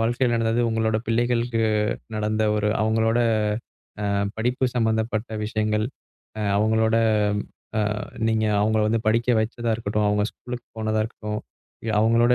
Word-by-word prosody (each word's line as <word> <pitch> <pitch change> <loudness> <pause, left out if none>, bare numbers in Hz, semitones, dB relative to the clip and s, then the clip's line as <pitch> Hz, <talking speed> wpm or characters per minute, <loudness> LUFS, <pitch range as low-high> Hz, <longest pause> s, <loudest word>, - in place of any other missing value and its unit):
வாழ்க்கையில 120 +2 +1
நடந்தது 115 +1 +1
உங்களோட 110 -1 +1
பிள்ளைகளுக்கு 115 0 +1 0.5
நடந்த 110 0 0
ஒரு 105 0 +1
அவங்களோட 110 +1 +2 0.8
ஆ - - -1 0.3
படிப்பு 125 +3 0
சம்பந்தப்பட்ட 110 0 0
விஷயங்கள், 110 0 0 0.5
ஆ - - -2 0.2
அவங்களோட 110 +1 +2 0.8
ஆ - - +3 0.5
நீங்க 110 0 +1 0.2
அவங்களை 110 +1 +2
வந்து 115 +1 +1
படிக்க 115 +2 +1
வைச்சதா 115 +1 -2
இருக்கட்டும், 105 -1 -1
அவங்க 105 0 +2
ஸ்கூல் 125 0 -7 0.2
போனதா 110 0 0
இருக்கட்டும், 105 -2 -5 0.6
அவங்களோட 115 +2 +4
110 Hz, 120 wpm, -24 LUFS, 110-115 Hz, 0.8 s, அவங்களோட